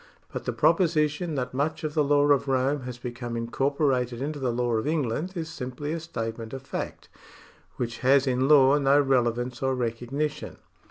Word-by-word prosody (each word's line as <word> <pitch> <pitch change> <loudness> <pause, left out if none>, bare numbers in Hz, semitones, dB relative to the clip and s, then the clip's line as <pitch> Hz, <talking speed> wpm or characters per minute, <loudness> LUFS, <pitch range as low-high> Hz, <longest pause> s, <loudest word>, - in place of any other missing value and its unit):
But - - -5
the - - 0
proposition 160 -2 +2
that 125 -2 -3
much 145 +5 -1
of 155 -1 -2
the 150 - +2
law 145 0 +3
of 140 0 +3
Rome 135 +2 +1
has 125 -1 -6
become 120 -1 -5
incorporated 125 0 0
into 145 +2 -3
the 130 -3 0
law 120 0 -1
of 110 - -2
England 155 +3 -1
is 165 -2 -3
simply 145 -1 -5
a 165 - -2
statement 115 -7 -5
of 135 0 -6
fact, - - -6 0.7
which 120 -1 -4
has 135 +1 +4
in 130 0 +1
law 145 -1 +6
no 140 +1 +4
relevance 125 -2 +1
or 130 -1 +1
recognition. 125 +5 -3
135 Hz, 175 wpm, -26 LUFS, 125-145 Hz, 0.7 s, law